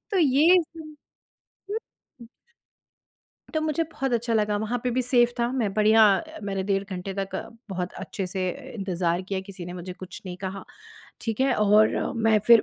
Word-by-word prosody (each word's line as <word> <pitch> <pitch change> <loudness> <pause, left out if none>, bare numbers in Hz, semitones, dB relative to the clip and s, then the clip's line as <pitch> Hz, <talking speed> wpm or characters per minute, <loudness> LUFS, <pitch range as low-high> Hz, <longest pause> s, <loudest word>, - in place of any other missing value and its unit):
तो 390 - +3
ये 315 +3 +6 0.2
हुँ। 310 -2 -10 0.7
हुँ, 435 - 0 0.4
हुँ। 230 - -12 1.3
तो 315 - +2
मुझे 310 +1 0
बहुत 270 -2 -2
अच्छा 235 0 0
लगा 210 -1 +2
वहाँ 220 +4 -1
पे 250 - +1
भी 255 +2 +1
सेफ 240 -1 +4
था, 235 0 +1
मैं 230 -7 0
बढ़िया 215 +1 +5 0.4
मैंने 195 -1 -2
डेढ़ 195 0 0
घंटे 185 +1 -4
तक 195 0 -4 0.3
बहुत 180 -2 -3
अच्छे 195 -3 -4
से 185 0 -2 0.3
इंतज़ार 180 -4 -1
किया 190 0 -3
किसी 190 -3 -8
ने 175 - -6
मुझे 180 0 -6
कुछ 185 0 -10
नहीं 180 - -5
कहा। 190 +1 -6 0.6
ठीक 225 +1 -3
है? 265 -1 +3
और 210 +1 +3
मैं 225 -1 +4
फिर 235 -2 +8
210 Hz, 175 wpm, -26 LUFS, 190-245 Hz, 1.3 s, फिर